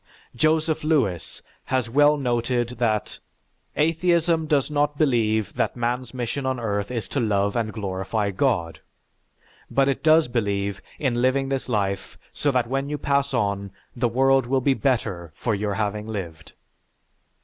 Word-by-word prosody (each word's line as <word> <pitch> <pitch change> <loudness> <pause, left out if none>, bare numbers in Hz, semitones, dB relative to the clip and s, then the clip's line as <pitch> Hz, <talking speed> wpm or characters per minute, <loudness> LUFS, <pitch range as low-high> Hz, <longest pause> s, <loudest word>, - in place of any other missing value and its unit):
Joseph 155 +3 +1
Lewis 115 - 0 0.2
has 130 -2 0
well 145 +5 +4
noted 120 -2 0
that, 110 -3 0 0.6
"Atheism 165 0 +2
does 145 -1 +1
not 145 0 +1
believe 110 - +1
that - - -1
man's 120 0 -2
mission 125 +2 -3
on 130 -1 -1
earth 100 -3 -2
is 120 -3 -3
to 140 - -1
love 100 -3 +1
and 115 -2 -1
glorify 100 0 -2
God, 95 -7 0 0.9
but 135 0 +2
it 140 - 0
does 160 -1 +5
believe 100 -4 -1 0.2
in 120 -4 0
living 135 +1 +2
this 135 -1 -2
life 100 -4 -2 0.2
so 145 - 0
that 125 -3 +2
when 135 +3 -2
you 150 - -2
pass 140 -1 0
on, 100 -5 -1 0.3
the 120 -1 +1
world 135 +1 +3
will 135 +1 +2
be 135 +1 +2
better 105 - -1
for 115 - -1
your 100 0 -1
having 105 0 -2
lived." 85 -8 -6
120 Hz, 150 wpm, -24 LUFS, 105-140 Hz, 0.9 s, does